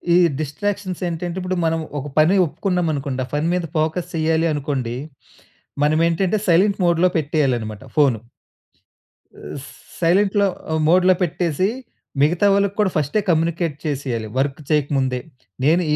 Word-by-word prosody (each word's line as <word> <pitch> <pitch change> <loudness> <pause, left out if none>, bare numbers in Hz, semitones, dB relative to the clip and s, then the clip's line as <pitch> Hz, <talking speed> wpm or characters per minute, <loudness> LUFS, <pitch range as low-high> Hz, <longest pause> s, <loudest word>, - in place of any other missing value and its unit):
ఈ - - +6 0.2
డిస్‌స్ట్రా‌క్షన్స్ 185 +4 -3
ఏంటంటే 175 +1 -4
ఇప్పుడు 185 0 -2
మనం 165 0 +1 0.2
ఒక 140 - -6
పని 155 +5 +5
ఒప్పుకున్నాం 180 +1 -1
అనుకోండి. 135 -2 -3
ఆ - - -17
పని 150 +2 0
మీద 180 -1 0
ఫోకస్ 160 +3 -1
చెయ్యాలి 160 +1 +1
అనుకోండి. 135 -5 -2 0.9
మనం 155 +2 +2
ఏంటంటే 190 +5 0
సైలెంట్ 195 +5 +3
మోడ్‌లో 170 +1 +3
పెట్టేయాలి 145 -4 +1
అన్నమాట 110 0 -7
ఫోను. 135 -7 +4 1.2
ఆహ్, - - -8
స్ 140 - -11 0.3
సైలెంట్‌లో 195 +4 +3 0.2
ఆహ్, 160 0 +1
మోడ్‌లో 185 +2 +5
పెట్టేసి 175 +1 0 0.5
మిగతా 170 +7 +3
వాళ్ళకి 200 0 +1
కూడా 205 -3 +3
ఫస్టే 150 +7 0
కమ్యూనికేట్ 165 -1 +1
చేసేయాలి 130 -7 -2
వర్క్ 135 +1 0
చేయక 150 -2 +2
ముందే. 130 -1 0 0.4
"నేను 165 +6 +4
160 Hz, 145 wpm, -21 LUFS, 145-180 Hz, 1.2 s, ఈ